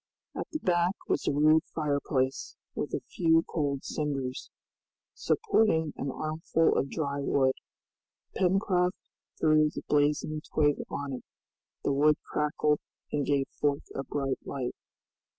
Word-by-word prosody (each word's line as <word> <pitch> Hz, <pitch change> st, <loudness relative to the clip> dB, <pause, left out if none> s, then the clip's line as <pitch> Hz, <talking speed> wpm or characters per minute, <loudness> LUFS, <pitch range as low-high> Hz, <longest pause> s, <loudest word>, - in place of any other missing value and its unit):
At -, -, -4 dB
the -, -, -1 dB
back 180 Hz, -, +1 dB
was -, -, 0 dB
a -, -, +4 dB
rude 155 Hz, +2 st, +5 dB
fireplace, 140 Hz, -3 st, -1 dB, 0.2 s
with -, -, -3 dB
a -, -, -3 dB
few 165 Hz, -1 st, +2 dB
cold 140 Hz, -4 st, -1 dB
cinders, 135 Hz, -4 st, -3 dB, 0.6 s
supporting 215 Hz, -, +2 dB
an 140 Hz, -, -3 dB
armful 155 Hz, +3 st, +1 dB
of 135 Hz, -, +1 dB
dry 140 Hz, -2 st, -2 dB
wood. 135 Hz, -1 st, +2 dB, 0.8 s
Pencroft 185 Hz, -1 st, +2 dB, 0.4 s
threw 155 Hz, -1 st, +4 dB
the -, -, -7 dB
blazing 150 Hz, +1 st, +1 dB
twig 145 Hz, -2 st, +3 dB
on 140 Hz, -1 st, -4 dB
it, 125 Hz, -, -6 dB, 0.6 s
the 140 Hz, -, +1 dB
wood 150 Hz, +2 st, +4 dB
crackled 150 Hz, 0 st, +1 dB, 0.3 s
and 145 Hz, -2 st, 0 dB
gave 140 Hz, -2 st, +2 dB
forth 145 Hz, -1 st, 0 dB
a 135 Hz, -, -3 dB
bright 135 Hz, -1 st, -2 dB
light. 130 Hz, -3 st, -3 dB
150 Hz, 135 wpm, -29 LUFS, 140-160 Hz, 0.8 s, rude